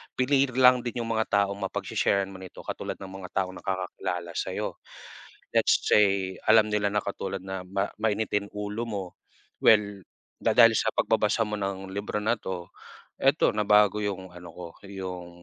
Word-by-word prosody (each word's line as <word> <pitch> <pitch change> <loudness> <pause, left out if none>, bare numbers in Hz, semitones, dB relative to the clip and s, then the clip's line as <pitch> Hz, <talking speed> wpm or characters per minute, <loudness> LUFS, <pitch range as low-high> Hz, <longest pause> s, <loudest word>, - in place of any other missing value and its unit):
pili 135 +2 +3
lang 125 -1 +6
din 120 0 -3
yung 115 - -4
mga 110 0 0 0.2
taong 100 0 -5
mapag 95 - -3
she-sharan 100 -1 +1
mo 95 - -9
nito. 95 -1 -10
Katulad - - -5
ng 95 -1 -9
mga 95 -1 -8
taong 95 0 -8
nakakakilala 90 -2 -4
sayo, - - -4 0.8
let's - - +4
say 95 -3 +3
alam 110 -1 +6
nila 105 -1 0
na 105 - +2
katulad 100 -1 -4
na 95 -1 -5
ma 95 +2 -2
mainitin 110 -1 0
ulo 105 +2 -4
mo. 100 -4 -3 0.6
Well 100 -3 +4 0.3
dahil - - +6
sa - - +1
pagbabasa - - +2
mo 105 -1 -2
ng 95 -1 -4
libro 100 +1 -3
na 115 +2 +1
to, 90 -4 -6 0.5
eto, - - +3
nabago 105 0 +4
yung 95 -3 -4
ano 90 -1 -11
ko, 90 +1 -9 0.2
yung, 90 -3 -6
100 Hz, 165 wpm, -27 LUFS, 95-105 Hz, 0.8 s, lang